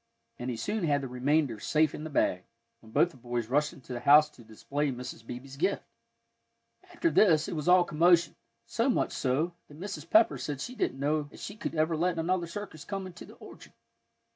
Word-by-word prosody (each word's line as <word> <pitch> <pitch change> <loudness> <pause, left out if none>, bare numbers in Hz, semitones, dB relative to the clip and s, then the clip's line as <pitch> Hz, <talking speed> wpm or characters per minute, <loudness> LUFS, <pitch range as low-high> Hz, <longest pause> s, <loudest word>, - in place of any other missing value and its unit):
And 125 - -4
he 120 - -3
soon 210 - -2
had 145 -2 +2
the 135 - -4
remainder 130 -1 0
safe 155 +4 +2
in 150 - -6
the - - -5
bag, 90 -10 0 0.3
when 110 - -17
both 175 - +3
the 140 - -17
boys 120 -1 -3
rushed 150 +3 +2
into 130 -1 -10
the 120 - -4
house 150 +4 +6
to 120 - -16
display 140 +6 -3
Mrs. 125 -2 -7
Beebe's 125 +3 -9
gift. 190 +6 0 1.1
After 335 - 0
this, 160 -8 +4
it 190 - -4
was 155 +1 -4
all 180 0 +6
commotion; 170 +1 +3 0.3
so 235 +3 0
much 245 - +1
so 145 +7 0
that 145 +1 -14
Mrs. 170 -4 -6
Pepper 220 +1 +4
said 145 -3 -4
she 245 - -5
didn't 170 - -2
know 145 +1 0
as - - -13
she 205 - -6
should - - -3
ever 160 +1 +1
let 175 +2 0
another 170 +1 0
circus 185 -5 -7
come 195 -2 -5
into 180 -2 -10
the - - -14
orchard. - - -14
150 Hz, 210 wpm, -29 LUFS, 135-175 Hz, 1.1 s, house